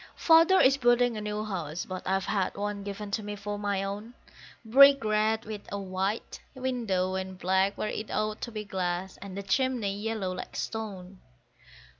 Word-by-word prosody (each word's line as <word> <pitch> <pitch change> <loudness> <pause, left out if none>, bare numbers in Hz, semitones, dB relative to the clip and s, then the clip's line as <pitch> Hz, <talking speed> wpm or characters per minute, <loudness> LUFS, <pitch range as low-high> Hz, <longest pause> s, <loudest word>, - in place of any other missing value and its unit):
Father 330 +3 +6
is 270 +1 +5
building 240 -2 +3
a 215 - -4
new 210 0 -3
house, 175 -6 -4
but 185 -1 -5
I've 190 0 +1
had 195 -3 -1
one 205 0 -3
given 200 +1 -6
to 215 - -1
me 210 0 -5
for 205 0 -5
my 200 -1 -1
own; 205 +5 -6 0.5
Brick 275 +4 +7
red, 215 +1 +1
with 210 -1 -6
a 200 - -2
white 195 +2 -3 0.2
window, 230 -8 -1
and 190 0 -4
black 190 +2 +1
where 215 - -2
it 215 - -5
ought 215 0 -2
to 235 - -4
be 215 -1 -5
glass, 185 -1 -3
and 195 -1 -8
the 200 - -4
chimney 220 -1 0
yellow, 210 -2 -2
like 185 - -7
stone. 195 -4 -5
205 Hz, 180 wpm, -28 LUFS, 190-220 Hz, 0.5 s, Brick